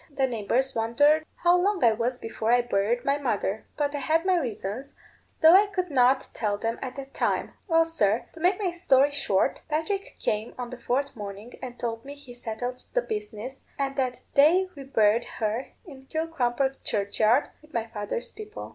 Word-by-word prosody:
The 275 -2 +1
neighbours 250 +2 0
wondered 290 +8 +3 0.2
how 350 0 +6
long 395 +1 +1
I 230 - +7
was 235 +3 -1
before 225 -1 -2
I 245 0 +5
buried 235 +3 0
my 280 +1 +2
mother; 215 -5 -1
but 290 -1 0
I 290 - -2
had 320 +4 +1
my 375 -1 +4
reasons, 250 - -3 0.5
though 320 +1 +9
I 400 +3 +7
could 365 -4 -3
not 260 0 +4
tell 210 -2 -1
them 225 +2 -2
at 260 -1 -5
that 275 0 -8
time. - - 0
Well, 330 -2 +4
sir, 225 -9 +1
to 330 - -12
make 360 +4 +2
my 380 -4 0
story 285 -5 +3
short, 200 -9 +1
Patrick 355 +6 -2
came 215 +2 -2
on 245 -1 -5
the 250 - -8
fourth 275 +4 -1
morning 205 +2 -8
and 250 -2 -7
told 230 -1 -3
me 280 +1 -8
he 285 -4 -12
settled 245 +1 -5
the - - +3
business, 270 - -6
and 275 -1 -1
that 255 -2 -2
day 335 +7 +5
we 275 -2 -9
buried 225 -3 +3
her 225 +3 -1 0.2
in 270 -6 -13
Kilcrumper 270 -5 -1
churchyard, 215 +6 +2
with 305 0 -20
my 230 -1 -1
father's 225 +1 -5
people." 430 0 -8
265 Hz, 190 wpm, -27 LUFS, 230-310 Hz, 0.5 s, though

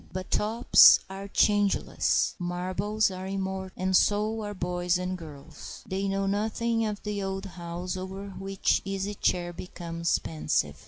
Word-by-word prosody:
But 185 0 -6
tops 220 +3 +6
are 195 +1 -6
changeless, 205 0 +2
marbles 185 +4 -1
are 185 0 -6
immortal, 190 -1 -3
and 190 0 0
so 210 +3 +2
are 205 -1 -5
boys 180 0 0
and 180 +1 -3
girls. 155 -3 -10
They 195 0 -2
know 195 0 0
nothing 220 +3 0
of 210 -1 -5
the 210 -1 -3
old 195 0 -3
house 175 0 -5
over 190 +2 -6
which 195 0 0
the 195 - -4
Easy 195 +1 -2
Chair 175 -3 0
becomes 170 -1 -2
pensive. 110 - -2
190 Hz, 150 wpm, -27 LUFS, 180-205 Hz, -, tops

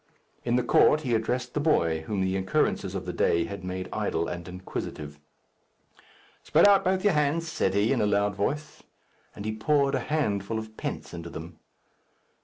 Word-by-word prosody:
In 120 0 +1
the 125 - +2
court 155 +3 +4
he 125 -5 -1
addressed 125 +2 -1
the - - 0
boy, 85 - +2
whom 100 -3 -1
the 95 0 0
occurrences 95 0 0
of - - -4
the - - -4
day 85 0 +2
had 100 +2 -7
made 90 0 -4
idle 85 +1 -1
and 85 0 -6
inquisitive. 75 -5 -6 1.2
"Spread - - +5
out 200 -1 +5
both 185 0 +1
your 205 - +4
hands," 150 +2 +1
said 160 - 0
he, 105 +6 +3
in 130 - +1
a 105 - +2
loud 100 0 +2
voice. 145 +10 -3 0.5
And 100 - -7
he 110 0 -2
poured 140 +4 +2
a - - +1
handful 110 -8 -1
of 110 0 -7
pence - - -5
into 85 0 -7
them. 80 0 -9
110 Hz, 185 wpm, -27 LUFS, 95-145 Hz, 1.2 s, Spread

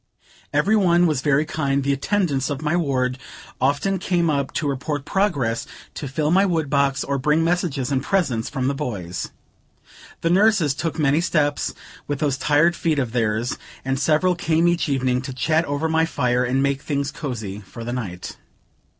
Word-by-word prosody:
Every 215 - +3
one 175 -4 +4
was 155 -6 +1
very 145 +1 +2
kind; 140 -3 -1
the 140 +1 +1
attendants 140 -3 0
of 145 +1 -4
my 155 +2 +1
ward 130 -6 0 0.4
often 145 +9 +1
came 175 -3 +1
up 140 -2 -1
to 150 - -1
report 140 +1 -3
progress, 145 - 0 0.3
to 145 - -5
fill 150 +3 -1
my 190 +3 +5
wood 165 -7 0
box, 140 -1 +2
or 140 0 -1
bring 150 +4 +2
messages 165 -6 0
and 135 -1 +1
presents 135 - 0
from 130 -3 -2
my 140 - +1
boys. 95 -10 -4 0.9
The 165 - +1
nurses 195 -6 +4
took 160 +3 -3
many 150 +1 +2
steps 150 -4 0 0.3
with 145 - -1
those 140 -1 0
tired 150 +5 +3
feet 160 -3 0
of 125 -5 -1
theirs, 115 +1 -1 0.3
and 135 0 0
several 155 +6 +3
came 165 -1 +1
each 175 -2 +1
evening, 130 -2 +1
to 135 0 -6
chat 160 +6 +1
over 145 +3 -1
my 160 0 +2
fire 125 -5 +1
and 130 +2 +1
make 140 -1 0
things 140 -1 -2
cosy 115 -10 -5
for 110 +3 -10
the 120 +1 -4
night. 95 -8 -5
145 Hz, 180 wpm, -22 LUFS, 130-165 Hz, 0.9 s, my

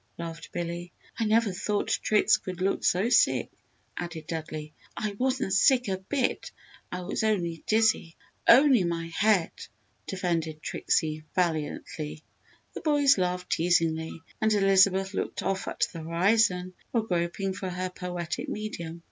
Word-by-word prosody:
laughed 165 0 -7
Billy. 175 0 -4 0.3
"I 225 - +1
never 220 -2 +2
thought 205 +3 -1
Trix 215 0 +4
could 185 -1 -7
look 195 +2 0
so 190 +6 +2
sick!" - - +3 0.4
added 165 -3 -6
Dudley. 155 -1 -5 0.2
"I 215 -1 -2
wasn't 255 -2 -1
sick 250 +5 +4
a 190 -1 -1
bit! 245 +7 -1 0.4
I 180 - -4
was 185 +4 -3
only 175 -7 0
dizzy 220 -6 +2 0.3
only 260 -3 +7
my 165 -1 -2
head!" 205 -5 +3 0.6
defended 165 -4 -2
Trixie, 155 -1 -1
valiantly. 155 -2 -2 0.5
The - - -6
boys 290 - +4
laughed 180 0 -2
teasingly 165 -1 +1 0.2
and 220 0 +3
Elizabeth 195 -1 +4
looked - - -3
off 190 +1 -1
at - - 0
the 165 - -6
horizon 180 +2 +2 0.2
while 230 -3 0
groping 185 0 -1
for 190 0 -5
her 180 0 -3
poetic 180 -2 -4
medium. 170 -6 -5
185 Hz, 140 wpm, -27 LUFS, 170-210 Hz, 0.6 s, only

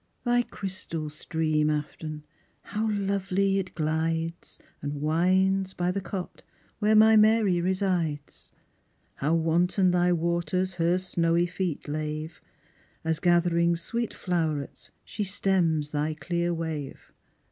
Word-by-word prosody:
Thy 245 0 +3
crystal 180 -8 -6
stream, 155 0 0
Afton, 150 0 -4 0.4
how 220 +1 -2
lovely 195 -1 0
it 185 -1 -5
glides, 165 +1 -2 0.2
And 145 0 -4
winds 185 +5 +2
by 180 0 0
the 195 +2 -2
cot 190 -1 -6 0.4
where 215 0 +3
my 220 +1 +7
Mary 215 -4 +4
resides; 180 -5 -2 0.7
How 155 +4 +1
wanton 175 +3 +2
thy 180 0 +3
waters 175 +2 0
her 170 +2 +3
snowy 170 -2 +1
feet 180 -3 -3
lave, 155 +2 -4 0.6
As 160 0 0
gathering 170 -1 +3
sweet 230 +7 -3
flow'rets 160 -6 -3 0.2
she 210 - -3
stems 180 -6 0
thy 150 +1 -1
clear 170 +3 -1
wave. 160 -4 -5
175 Hz, 115 wpm, -27 LUFS, 160-190 Hz, 0.7 s, my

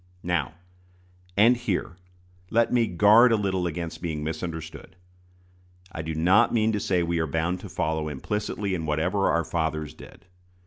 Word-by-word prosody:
Now, 85 -4 -1 0.8
and 115 +4 +6
here, 120 -5 -3 0.5
let 115 +1 +2
me 120 -2 +3
guard 105 +7 +6
a - - +5
little 95 -4 -1
against 85 0 -5
being 80 -4 -3
misunderstood. 80 +2 -6 1.0
I 80 - -5
do 80 0 -5
not 95 +9 +4
mean 110 -1 +2
to 105 - -1
say 90 -3 0
we 85 0 -1
are 80 - 0
bound 80 +4 -1
to - - -9
follow 80 0 -2
implicitly 105 +6 -3
in 80 -3 -3
whatever 85 +6 0
our 85 -1 +1
fathers 80 -2 -2
did. - - -15
85 Hz, 155 wpm, -25 LUFS, 80-105 Hz, 1.0 s, and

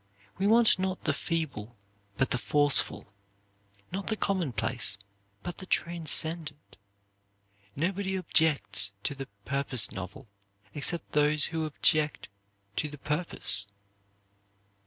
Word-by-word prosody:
We 195 - +1
want 225 -2 +5
not 190 0 -3
the - - +1
feeble 135 -10 -3 0.4
but 135 - 0
the 125 - 0
forceful; 140 -3 +2 0.8
not 195 +2 -5
the 220 - -2
commonplace 125 - -2 0.5
but 175 - -7
the 185 - -10
transcendent. 160 -3 +3 1.0
Nobody 190 +5 -2
objects 145 - +3
to - - 0
the 135 -1 -8 0.2
'purpose 135 -5 0
novel' 95 +7 -8 0.5
except 165 +4 -4
those 150 0 +2
who 160 -1 -1
object 155 0 +2 0.5
to 150 - -1
the 150 - -10
purpose. 145 - -3
150 Hz, 110 wpm, -28 LUFS, 135-175 Hz, 1.0 s, want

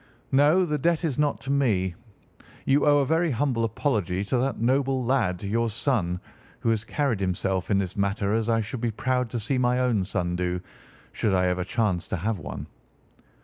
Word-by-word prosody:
"No, 150 +7 +4
the 150 -3 -1
debt 170 +4 +1
is 150 -4 -2
not 150 -1 +1
to 135 - -3
me. 105 -10 +1 0.7
You 140 +2 +3
owe 145 0 +6
a - - +1
very 165 +4 +2
humble 125 -3 0
apology 105 - -1
to 115 +5 0
that 135 +2 -1
noble 130 +2 +1
lad, 110 -9 +1
your 115 +3 0
son, 110 -6 -1 0.4
who - - +1
has 110 -1 0
carried 130 -1 -1
himself 95 0 -1
in 100 - +3
this 95 -2 -2
matter 100 +1 0
as 115 0 0
I 115 -1 +3
should 115 +2 -5
be 120 - +1
proud 125 +2 -1
to 120 - -3
see 130 +5 -1
my 125 0 +2
own 125 -6 +2
son 90 -2 -2
do, 90 0 -1 0.5
should 100 -3 0
I 90 0 +3
ever 90 0 0
chance 95 -3 -1
to - - -2
have 105 +3 -2
one." 75 - -6
115 Hz, 195 wpm, -26 LUFS, 95-135 Hz, 0.7 s, owe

